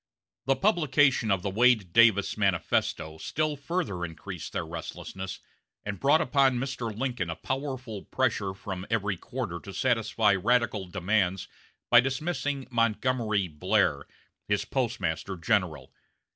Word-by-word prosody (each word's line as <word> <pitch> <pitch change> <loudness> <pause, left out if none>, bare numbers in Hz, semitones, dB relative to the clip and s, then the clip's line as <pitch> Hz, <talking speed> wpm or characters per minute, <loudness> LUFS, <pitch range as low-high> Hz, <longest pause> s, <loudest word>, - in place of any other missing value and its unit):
The 135 - +4
publication 145 - +3
of 95 -2 +1
the 100 - -1
Wade 110 -4 +3
Davis 110 -4 +5
manifesto 85 -5 0
still 155 - -1
further 145 - -3
increased 85 +1 -6
their - - -3
restlessness, 90 +3 -7 0.4
and 100 -1 -4
brought 145 +4 +4
upon 135 -3 +3
Mr. 125 -3 -3
Lincoln 120 -8 -2
a 80 - -3
powerful 130 - -4
pressure 95 -1 -1
from 95 0 -6
every 100 -3 0
quarter 100 -3 -5
to 100 - -10
satisfy 115 -1 +2
radical 110 0 +1
demands 95 0 0 0.4
by 120 - +9
dismissing 140 +1 -1
Montgomery 115 -3 +1
Blair, 75 -2 +1 0.4
his 105 -1 0
Postmaster 100 - -2
General. 85 - -1
110 Hz, 125 wpm, -28 LUFS, 95-130 Hz, 0.4 s, by